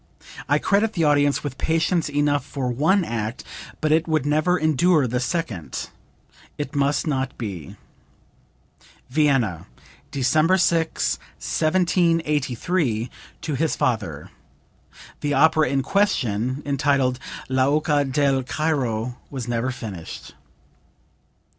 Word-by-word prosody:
I - - +4
credit 210 +2 +1
the 170 - 0
audience 145 -1 +3
with 140 -3 -5
patience 165 0 +1
enough 145 -1 +1
for 135 -2 -3
one 160 +10 +2
act, 115 -1 -4 0.4
but 155 - +1
it 160 +2 +3
would 155 -4 +1
never 155 +5 +2
endure 155 0 +3
the 125 0 -1
second. 125 - -3 0.7
It 145 -2 -5
must 140 +3 +1
not 135 -3 -2
be." 95 - -6 1.4
(Vienna, 130 - +1 0.4
December 155 +7 +2
6, 165 -3 +1 0.2
1783, 160 - +1 0.3
to 155 - -3
his 155 +3 0
father. 95 - -2 0.9
The 145 -1 -1
opera 155 -3 +4
in 135 0 0
question, 130 - 0
entitled 140 -3 +1 0.3
"L'Oca 145 +3 +2
del 135 0 +1
Cairo," 125 -5 -1
was 130 -4 -5
never 120 +1 -1
finished.) 100 -9 -7
145 Hz, 110 wpm, -23 LUFS, 125-160 Hz, 1.4 s, I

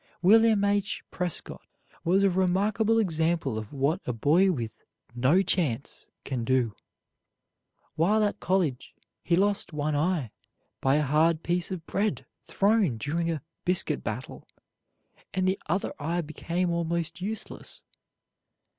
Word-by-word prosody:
William 220 +1 +5
H. 200 0 0
Prescott 180 -3 -2 0.4
was 190 +4 +3
a 195 - +5
remarkable 200 +5 +2
example 165 - +1
of 110 - -9
what 145 +6 0
a - - +1
boy 165 - +3
with 115 -9 -3 0.4
"no 135 +11 +3
chance" 150 -9 -1 0.2
can 125 -4 -3
do. 125 -3 +1 1.2
While 200 +8 +2
at 205 - -1
college, 175 -9 -1 0.3
he 170 - +1
lost 200 -2 0
one 150 0 -1
eye 150 - 0 0.5
by 135 +1 +3
a 150 - +2
hard 155 +3 +2
piece 175 0 -1
of 180 -4 -5
bread 205 +2 -1 0.2
thrown 200 - +2
during 165 +8 -1
a 160 -4 -3 0.2
"biscuit 180 +1 +1
battle," - - -6 0.9
and 185 0 +1
the 190 +1 +1
other 185 +5 -1
eye 165 +4 -1
became 170 +3 -2
almost 170 0 -2
useless. 215 +3 -6
170 Hz, 130 wpm, -27 LUFS, 150-195 Hz, 1.2 s, William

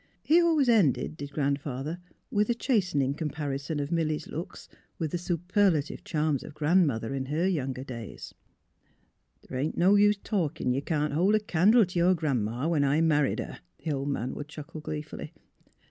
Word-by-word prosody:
He 335 +3 +5
always 320 -5 +3
ended, 190 - +3
did 145 -2 -7
Grandfather, 140 +2 -2 0.3
with 210 +1 +1
a 240 - +2
chastening 180 - +1
comparison 145 -1 -3
of 145 +2 -3
Milly 160 -2 +1
's - - -10
looks 165 +4 -7 0.2
" - - -40
with 160 -3 -2
the 175 - -2
superlative 175 -2 0
charms 155 -4 0
of 150 - -10
Grandmother, 150 -7 +2
in 135 -1 -3
her 160 +6 0
younger 135 -7 -2
days: 120 -5 -8 0.6
" - - -42
The' - - -7
ain't 145 +5 -2
no 185 +3 +5
use 205 0 +5
o' - - -33
talkin', 155 - -1
ye 135 - -1
can't 150 -1 -1
hold 185 +7 +3
a - - +4
candle 210 +3 +4
t' 180 0 -3
yer 180 +2 +4
Gran 145 -9 0
'ma, 120 +7 -2
when 160 -4 +2
I 140 +2 +2
married 150 -3 +2
her! - - -8
" - - -46
the 160 - 0
old 140 0 -2
man 130 -2 -2
would 145 - -6
chuckle 150 +1 -9
gleefully. 150 0 -6
155 Hz, 190 wpm, -28 LUFS, 140-180 Hz, 0.6 s, He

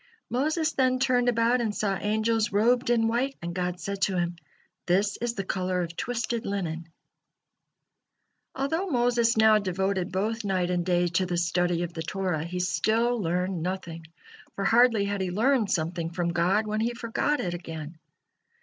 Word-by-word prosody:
Moses 310 +6 +1
then 255 -1 +2
turned 250 -2 +2
about 235 +1 +2
and 215 -3 -1
saw 200 -2 0
angels 215 +2 0
robed 240 +5 +2
in 230 -2 +3
white, 255 +4 -1
and 170 0 -5
God 180 0 -2
said 195 +3 -5
to 190 -2 +1
him: 175 0 -1 0.5
"This 195 +3 +2
is 235 0 -2
the 195 - -2
color 185 -1 -1
of 170 0 -7
twisted 235 +1 -2
linen." 170 -4 -3 1.7
Although 320 +8 -1
Moses 240 -4 +2
now 220 -1 +6
devoted 190 -1 -1
both 215 +5 -1
night 185 -3 0
and 175 -1 0
day 175 0 +2
to 180 +2 0
the 175 -1 -1
study 175 0 +1
of 170 -1 -5
the 160 - -5
Torah, 180 -1 -2
he 180 +1 -4
still 225 +5 +1
learned 180 0 -1
nothing, 170 -2 -5 0.5
for 195 - -2
hardly 230 -1 +4
had 200 -1 -2
he 185 - -1
learned 225 +3 +2
something 165 0 -1
from 170 0 -2
God 180 +5 +2
when 215 0 -2
he 235 +2 -1
forgot 245 +5 -1
it 180 -7 -2
again. 160 -2 -7
195 Hz, 170 wpm, -27 LUFS, 175-235 Hz, 1.7 s, now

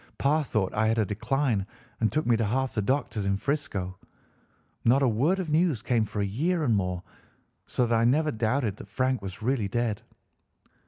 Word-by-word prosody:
Pa 150 +3 +2
thought 110 -9 -1
I 110 +1 +2
had 115 +1 +2
a 110 - +3
decline 110 0 0 0.3
and 110 - +2
took 155 - 0
me 120 - +4
to 115 - 0
half 130 +5 0
the 110 - 0
doctors 125 -2 -1
in 100 0 +1
'Frisco. 100 -8 -3 0.8
Not 130 +4 +4
a - - +4
word 135 - +2
of 180 -5 -3
news 155 -8 +2
came 115 -2 +2
for 105 0 -3
a - - +1
year 160 - 0
and 120 -6 +3
more, 90 -2 -1 0.6
so 125 - +1
that 115 0 +1
I 115 - +3
never 150 +6 +3
doubted 110 -1 0
that - - -10
Frank 130 +2 0
was 100 +2 -7
really 120 -4 +1
dead. 115 +1 -1
115 Hz, 200 wpm, -27 LUFS, 105-140 Hz, 0.8 s, me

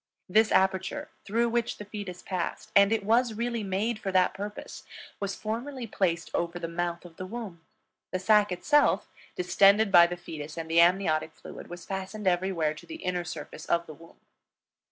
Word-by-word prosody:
This 215 +4 +4
aperture 190 0 +1 0.2
through 235 +3 +1
which 235 0 -1
the 210 - -8
fetus 200 -3 -7
passed, 185 -3 -4
and 200 0 +6
it 225 -2 +1
was 230 +1 +3
really 235 0 -2
made 210 +3 -1
for 195 - -3
that 185 -1 +3
purpose, 205 +1 -7 0.4
was 200 -1 -3
formerly 240 +4 -4
placed 170 -6 -1
over 170 0 -1
the 170 - -4
mouth 175 +1 -3
of 165 -2 -13
the 185 - -5
womb; 205 -6 -7 0.5
the 185 - -1
sac 210 +1 +4
itself, 295 - +2 0.2
distended 200 +3 +4
by 170 -2 +8
the 175 0 -5
fetus 155 -2 -8
and 160 -1 -5
the 170 +1 +6
amniotic 170 -3 +2
fluid, - - -10
was 175 -1 -9
fastened 195 +2 -5
everywhere 175 -4 +1
to 155 - -13
the 325 - -7
inner 180 -1 -1
surface 155 -2 -8
of 170 0 +1
the 155 - -9
womb. 165 +3 -17
190 Hz, 180 wpm, -28 LUFS, 170-215 Hz, 0.5 s, by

